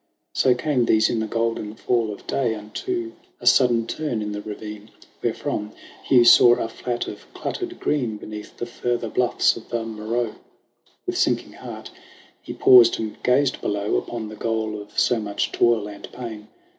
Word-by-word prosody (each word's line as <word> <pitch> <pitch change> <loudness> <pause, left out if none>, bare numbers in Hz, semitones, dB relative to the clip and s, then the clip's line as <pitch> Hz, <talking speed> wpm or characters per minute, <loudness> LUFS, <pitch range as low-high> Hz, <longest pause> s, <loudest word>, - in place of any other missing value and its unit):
So 125 -1 +3
came 125 -1 +1
these 110 -1 +3
in 115 - 0
the 110 - -2
golden 115 -1 -2
fall 115 -1 0
of 100 - -10
day 120 -5 0
Unto 340 - -4 0.3
a - - -11
sudden 120 -2 +5
turn 120 -4 -3
in 105 - -4
the 105 0 -4
ravine, 105 0 -8 0.3
Wherefrom 105 +1 -2 0.3
Hugh 125 -3 +5
saw 120 0 +8
a 115 - -2
flat 120 +1 -4
of - - -9
cluttered 355 -2 -4
green 120 -8 -1
Beneath 105 0 -9
the - - -3
further 120 0 -2
bluff's 125 +1 +2
of 115 - -11
the 115 -1 -2
Moreau. 110 +1 -2 0.7
With - - -2
sinking - - +1
heart - - -9 0.5
he - - -8
paused 120 -2 +6
and 110 -1 -5
gazed 130 +2 +2
below 105 0 -1
Upon 115 -2 -4
the 110 - -8
goal 110 -1 -2
of 105 - -14
so 120 - +3
much 105 -1 -2
toil 115 -3 +2
and 100 -1 -10
pain. 110 -4 -8
115 Hz, 170 wpm, -23 LUFS, 105-120 Hz, 0.7 s, saw